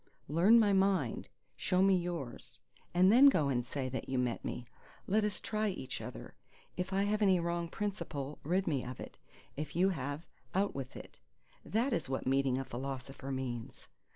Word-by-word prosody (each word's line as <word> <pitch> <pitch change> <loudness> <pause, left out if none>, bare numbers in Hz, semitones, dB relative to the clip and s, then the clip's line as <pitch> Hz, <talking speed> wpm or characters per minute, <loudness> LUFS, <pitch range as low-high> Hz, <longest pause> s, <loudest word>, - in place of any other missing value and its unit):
Learn 175 - +6
my 205 -3 +4
mind—show 190 - 0
me 195 -1 +5
yours; 170 -8 -4 0.3
and 185 +2 +5
then 260 +5 +9
go 150 - +2
and 125 -2 +1
say 130 +2 -3
that 130 +1 -5
you 130 - 0
met 125 -2 -1
me. 120 - -4 0.4
Let 215 +3 +2
us 210 -2 -1
try 215 0 -1
each 180 -9 -5
other; - - -8 0.4
if 180 +1 -3
I 195 +1 +2
have 210 +1 0
any 190 -3 +5
wrong 170 0 -1
principle, 165 -8 -4
rid 185 +5 +1
me 140 -6 0
of 125 +1 -7
it; - - -9 0.4
if 150 +2 -5
you 185 +3 +4
have, 145 -1 -3 0.3
out 200 +1 +2
with 135 -2 -6
it. - - -12 0.4
That 235 +5 0
is 160 - -1
what 135 - -2
meeting 135 0 +2
a 135 - -3
philosopher 135 +1 -5
means. 125 -3 -5
165 Hz, 180 wpm, -33 LUFS, 135-195 Hz, 0.4 s, then